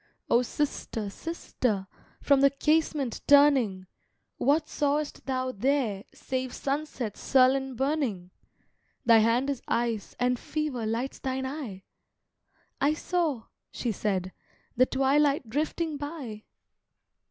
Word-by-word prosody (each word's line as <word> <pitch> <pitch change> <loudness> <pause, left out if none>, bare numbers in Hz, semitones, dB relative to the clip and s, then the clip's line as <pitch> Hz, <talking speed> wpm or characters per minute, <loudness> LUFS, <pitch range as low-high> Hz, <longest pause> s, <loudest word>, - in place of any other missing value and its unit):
"O 235 - +6
sister, 235 -6 -3
sister, 245 - -2 0.4
from 280 -1 +4
the 275 - +7
casement 300 -3 0
turning, 270 -10 +5 0.5
What 290 +4 +2
saw'st 290 0 -1
thou 255 -1 -1
there 235 -4 0
save 260 -1 -4
sunset's 275 -6 -3
sullen 265 0 +3
burning? 255 - -1 0.7
Thy 230 -2 +7
hand 230 +4 +2
is 280 -3 -2
ice, 230 -3 -1
and 250 0 +1
fever 295 -7 -3
lights 235 +4 -2
thine 265 0 -2
eye!" 260 -9 -6 1.0
"I 295 +2 +3
saw," 315 -8 -1 0.3
she 240 - -2
said, 190 -3 -2 0.4
"the 255 +2 +4
twilight 275 0 +2
drifting 310 +3 -1
by." 280 -8 -6
265 Hz, 110 wpm, -28 LUFS, 230-290 Hz, 1.0 s, the